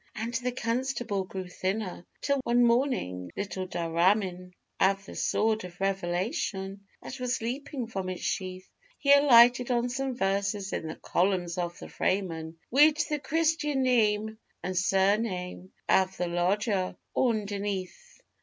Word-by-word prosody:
_ -, -, -35 dB
And 225 Hz, +2 st, -4 dB
the 250 Hz, +1 st, -1 dB
constable 240 Hz, -4 st, -2 dB
grew 185 Hz, 0 st, -6 dB
thinner, 185 Hz, 0 st, -3 dB
till 280 Hz, -1 st, +1 dB
one 240 Hz, 0 st, +3 dB
morning, 235 Hz, -, 0 dB
'little 185 Hz, -1 st, -3 dB
dhramin' 180 Hz, +2 st, 0 dB, 0.3 s
Av 195 Hz, 0 st, +2 dB
the -, -, -10 dB
sword 220 Hz, -1 st, +1 dB
of 180 Hz, -1 st, -10 dB
revelation 195 Hz, -, -2 dB, 0.2 s
that 265 Hz, -, -7 dB
was 250 Hz, 0 st, -1 dB
leapin' 255 Hz, +2 st, -4 dB
from 195 Hz, -5 st, -4 dB
its 185 Hz, -, -5 dB
sheath,' 185 Hz, 0 st, -3 dB, 0.3 s
He 280 Hz, -1 st, +5 dB
alighted 250 Hz, -3 st, +6 dB
on 245 Hz, 0 st, +1 dB
some 265 Hz, +1 st, -2 dB
verses 195 Hz, 0 st, -1 dB
in 160 Hz, -, -3 dB
the 160 Hz, -, -5 dB
columns 180 Hz, -2 st, 0 dB
of 175 Hz, 0 st, -3 dB
the -, -, -9 dB
FRAYMAN, 165 Hz, -4 st, -2 dB, 0.2 s
'_Wid 300 Hz, +2 st, +5 dB
the 300 Hz, -1 st, -1 dB
christian 300 Hz, -2 st, +1 dB
name 220 Hz, -3 st, +2 dB, 0.2 s
an' 185 Hz, -, -2 dB
surname 190 Hz, -1 st, 0 dB, 0.2 s
av 190 Hz, 0 st, +3 dB
the 180 Hz, -, -1 dB
lodger 185 Hz, +3 st, 0 dB, 0.2 s
onderneath! 205 Hz, -, -2 dB
200 Hz, 140 wpm, -28 LUFS, 185-245 Hz, 0.3 s, alighted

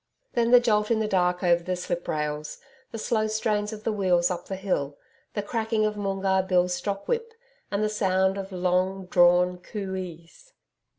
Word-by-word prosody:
Then 235 Hz, -1 st, +2 dB
the 245 Hz, 0 st, +8 dB
jolt 210 Hz, -3 st, +1 dB
in 230 Hz, -, +3 dB
the 215 Hz, -, 0 dB
dark 180 Hz, -2 st, +1 dB
over 175 Hz, -1 st, +4 dB
the 185 Hz, +1 st, -2 dB
sliprails, 150 Hz, -4 st, -3 dB, 0.3 s
the 225 Hz, -, -5 dB
slow 215 Hz, 0 st, 0 dB
strain 215 Hz, -1 st, 0 dB
of 215 Hz, 0 st, -7 dB
the 225 Hz, -, 0 dB
wheels 185 Hz, -4 st, +2 dB
up 175 Hz, -1 st, -5 dB
the 195 Hz, -, -3 dB
hill, 165 Hz, -7 st, -2 dB, 0.4 s
the 205 Hz, -, -1 dB
cracking 220 Hz, 0 st, 0 dB
of 215 Hz, 0 st, -1 dB
Moongarr 195 Hz, -1 st, 0 dB
Bill's 180 Hz, -1 st, +2 dB
stock 200 Hz, +2 st, -3 dB
whip, 460 Hz, -1 st, -2 dB, 0.3 s
and 200 Hz, +1 st, -1 dB
the -, -, +2 dB
sound 190 Hz, -2 st, +1 dB
of 195 Hz, 0 st, -6 dB
long 185 Hz, +1 st, 0 dB
drawn 180 Hz, 0 st, +4 dB
COO 195 Hz, +1 st, -6 dB
EES. 180 Hz, -, -9 dB
190 Hz, 180 wpm, -26 LUFS, 180-215 Hz, 0.4 s, the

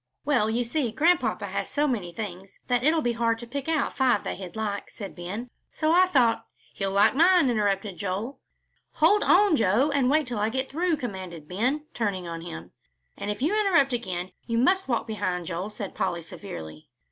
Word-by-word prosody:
"Well, 255 Hz, -7 st, +2 dB
you 235 Hz, +2 st, +1 dB
see 240 Hz, 0 st, -1 dB
Grandpapa 295 Hz, -6 st, +2 dB
has 200 Hz, 0 st, -3 dB
so 295 Hz, +1 st, +1 dB
many 205 Hz, -10 st, -2 dB
things 190 Hz, -1 st, -7 dB
that 245 Hz, -1 st, +2 dB
it'll 310 Hz, +3 st, +3 dB
be 240 Hz, -, +1 dB
hard 230 Hz, 0 st, +1 dB
to 235 Hz, -, -8 dB
pick 280 Hz, +5 st, -5 dB
out 315 Hz, -3 st, 0 dB
five 255 Hz, -6 st, +2 dB
that -, -, -4 dB
he'd 185 Hz, -1 st, -8 dB
like," 210 Hz, -2 st, -3 dB
said 200 Hz, -4 st, -8 dB
Ben, 205 Hz, +8 st, -6 dB, 0.2 s
"so 310 Hz, 0 st, 0 dB
I 365 Hz, +2 st, +6 dB
thought 250 Hz, -9 st, +3 dB, 0.2 s
" -, -, -31 dB
"He'll 195 Hz, -1 st, -2 dB
like 200 Hz, +2 st, +5 dB
mine," 335 Hz, -3 st, +5 dB
interrupted 205 Hz, -3 st, 0 dB
Joel. 200 Hz, +7 st, -3 dB, 0.5 s
"Hold 415 Hz, 0 st, +4 dB
on, 385 Hz, -2 st, +5 dB
Joe, 235 Hz, +5 st, +3 dB
and 270 Hz, -3 st, +2 dB
wait 305 Hz, +1 st, +3 dB
till 245 Hz, -4 st, -4 dB
I 210 Hz, +1 st, +1 dB
get 260 Hz, +3 st, -2 dB
through," 335 Hz, +2 st, +1 dB
commanded 185 Hz, -, -6 dB
Ben, 255 Hz, -, -1 dB
turning 200 Hz, -6 st, -2 dB
on 165 Hz, 0 st, -5 dB
him. 90 Hz, -, -8 dB, 0.4 s
"And 205 Hz, -, -5 dB
if 210 Hz, +4 st, -3 dB
you 320 Hz, -, +2 dB
interrupt 350 Hz, -11 st, +3 dB
again, 185 Hz, -6 st, -3 dB, 0.2 s
you 230 Hz, -1 st, 0 dB
must 370 Hz, +9 st, +3 dB
walk 235 Hz, -3 st, 0 dB
behind, 185 Hz, -5 st, -2 dB
Joel," 180 Hz, +4 st, -4 dB
said 210 Hz, -2 st, -6 dB
Polly, 175 Hz, -3 st, -2 dB
severely. 80 Hz, -, -9 dB
230 Hz, 200 wpm, -26 LUFS, 195-280 Hz, 0.5 s, I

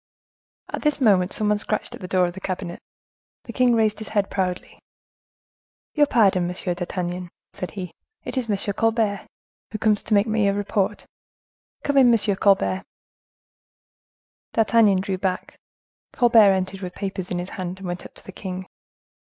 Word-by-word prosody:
At -, -, -5 dB
this 300 Hz, -2 st, +1 dB
moment 195 Hz, -7 st, +3 dB
someone 210 Hz, -1 st, 0 dB
scratched 215 Hz, 0 st, -2 dB
at -, -, -10 dB
the 180 Hz, -, -6 dB
door 185 Hz, 0 st, +3 dB
of 175 Hz, -, -3 dB
the 190 Hz, -, -9 dB
cabinet; 185 Hz, -2 st, -4 dB, 0.6 s
the 235 Hz, -, -9 dB
king 250 Hz, -1 st, +3 dB
raised 215 Hz, -2 st, +1 dB
his 220 Hz, -, -7 dB
head 205 Hz, -2 st, 0 dB
proudly. 180 Hz, -2 st, -3 dB, 1.1 s
"Your 295 Hz, -1 st, +4 dB
pardon, 195 Hz, -8 st, +3 dB
Monsieur 180 Hz, 0 st, -2 dB
d'Artagnan," 175 Hz, 0 st, -4 dB, 0.2 s
said 180 Hz, -, -5 dB
he; 180 Hz, -3 st, -5 dB, 0.3 s
"it -, -, -5 dB
is 250 Hz, -3 st, -2 dB
M. 205 Hz, -, +1 dB, 0.2 s
Colbert, 220 Hz, -2 st, 0 dB, 0.4 s
who 215 Hz, -, -4 dB
comes 215 Hz, -1 st, +2 dB
to 215 Hz, -, 0 dB
make 200 Hz, +1 st, +4 dB
me 220 Hz, -2 st, +1 dB
a 200 Hz, -, +1 dB
report. 205 Hz, -1 st, -1 dB, 0.8 s
Come 285 Hz, -1 st, +3 dB
in, 250 Hz, -2 st, +6 dB
M. 210 Hz, -3 st, +2 dB
Colbert." 195 Hz, -1 st, +2 dB, 1.7 s
D'Artagnan 220 Hz, -4 st, +4 dB
drew 190 Hz, -1 st, -3 dB
back. 185 Hz, -1 st, -3 dB, 0.5 s
Colbert 230 Hz, -5 st, +6 dB
entered 190 Hz, 0 st, -2 dB
with 180 Hz, -1 st, -6 dB
papers 190 Hz, -2 st, -4 dB
in 180 Hz, -, -2 dB
his 175 Hz, +1 st, -4 dB
hand, 185 Hz, -3 st, -5 dB
and 190 Hz, -, -9 dB
went 175 Hz, 0 st, -4 dB
up -, -, -13 dB
to -, -, -15 dB
the -, -, -8 dB
king. 185 Hz, 0 st, -6 dB
195 Hz, 165 wpm, -23 LUFS, 185-220 Hz, 1.7 s, in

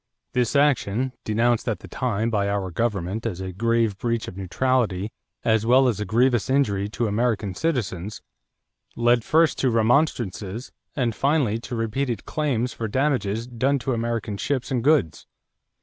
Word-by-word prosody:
This 125 Hz, +1 st, +1 dB
action, 130 Hz, -4 st, +2 dB
denounced 115 Hz, +2 st, +1 dB
at 110 Hz, -, -3 dB
the -, -, -10 dB
time 115 Hz, -3 st, -1 dB
by 100 Hz, -2 st, +1 dB
our 100 Hz, -2 st, -2 dB
government 105 Hz, +1 st, -1 dB
as 95 Hz, -5 st, -4 dB
a 95 Hz, 0 st, -4 dB
grave 115 Hz, +1 st, +1 dB
breach 115 Hz, -2 st, -1 dB
of -, -, -7 dB
neutrality 105 Hz, 0 st, 0 dB, 0.3 s
as 110 Hz, -2 st, +2 dB
well 130 Hz, +3 st, +5 dB
as 110 Hz, -5 st, 0 dB
a 105 Hz, -, -2 dB
grievous 120 Hz, +3 st, +2 dB
injury 105 Hz, -8 st, +1 dB
to 115 Hz, +2 st, -2 dB
American 105 Hz, -2 st, 0 dB
citizens, 105 Hz, -, -2 dB, 0.8 s
led 120 Hz, 0 st, +3 dB
first 160 Hz, +3 st, +3 dB
to 130 Hz, -, +2 dB
remonstrances 115 Hz, -, 0 dB, 0.2 s
and 120 Hz, -5 st, 0 dB
finally 135 Hz, -5 st, +1 dB
to 120 Hz, +1 st, -6 dB
repeated 115 Hz, +2 st, -2 dB
claims 125 Hz, -6 st, -1 dB
for 115 Hz, -, -4 dB
damages 115 Hz, -4 st, 0 dB
done 130 Hz, +3 st, 0 dB
to 130 Hz, 0 st, -2 dB
American 115 Hz, -3 st, -2 dB
ships 135 Hz, +3 st, -2 dB
and 125 Hz, -3 st, 0 dB
goods. 140 Hz, -, +2 dB
115 Hz, 155 wpm, -24 LUFS, 105-130 Hz, 0.8 s, well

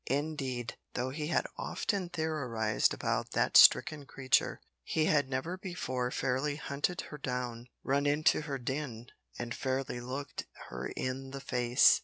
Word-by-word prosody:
Indeed, 135 Hz, -4 st, -2 dB, 0.2 s
though 125 Hz, +1 st, -1 dB
he 150 Hz, +2 st, -3 dB
had -, -, +1 dB
often 195 Hz, -4 st, -1 dB
theorised 140 Hz, -10 st, 0 dB
about -, -, -1 dB
that -, -, +1 dB
stricken 150 Hz, -3 st, +7 dB
creature, 130 Hz, -3 st, +1 dB, 0.2 s
he 155 Hz, -, +1 dB
had 145 Hz, -4 st, +3 dB
never 160 Hz, +8 st, -2 dB
before 130 Hz, -10 st, -2 dB
fairly 130 Hz, +4 st, 0 dB
hunted 150 Hz, +5 st, -2 dB
her 150 Hz, -, -7 dB
down, 125 Hz, -2 st, -3 dB, 0.2 s
run 140 Hz, +1 st, +1 dB
her 145 Hz, -, +4 dB
into 155 Hz, +1 st, +3 dB
her 145 Hz, -3 st, -3 dB
den, 130 Hz, -2 st, -4 dB, 0.3 s
and 120 Hz, -1 st, -3 dB
fairly 130 Hz, -1 st, -2 dB
looked 130 Hz, +3 st, -5 dB, 0.2 s
her -, -, -4 dB
in 130 Hz, +1 st, -3 dB
the 135 Hz, +1 st, -6 dB
face. 125 Hz, +12 st, +4 dB
135 Hz, 150 wpm, -32 LUFS, 125-150 Hz, 0.3 s, stricken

